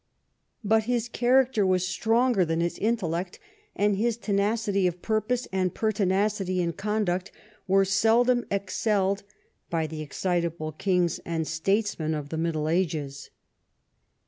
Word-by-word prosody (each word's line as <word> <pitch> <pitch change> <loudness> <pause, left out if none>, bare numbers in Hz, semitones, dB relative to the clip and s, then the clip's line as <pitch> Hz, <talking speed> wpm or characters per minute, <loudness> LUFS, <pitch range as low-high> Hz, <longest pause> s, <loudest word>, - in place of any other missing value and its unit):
But 220 +1 +2
his 240 -1 0
character 245 -1 +2
was 185 -1 +2
stronger 225 +2 +2
than 165 -1 -1
his 170 0 -1
intellect, 185 -6 -1 0.4
and 205 0 +2
his 230 +3 0
tenacity 205 -2 +1
of 175 0 -5
purjDOse 225 +3 0
and 185 -2 0
pertinacity 200 -2 0
in 170 -1 0
conduct 200 -2 -1 0.4
were 195 +1 +4
seldom 230 +6 +3
excelled 200 0 0 0.5
by 165 -2 0
the 155 0 -6
excitable 170 0 -2
kings 180 +2 0
and 165 -2 -2
statesmen 160 -1 0
of 145 -1 -5
the 160 - -4
Middle 160 -2 -1
Ages. 155 -5 -2
195 Hz, 125 wpm, -26 LUFS, 170-215 Hz, 0.5 s, were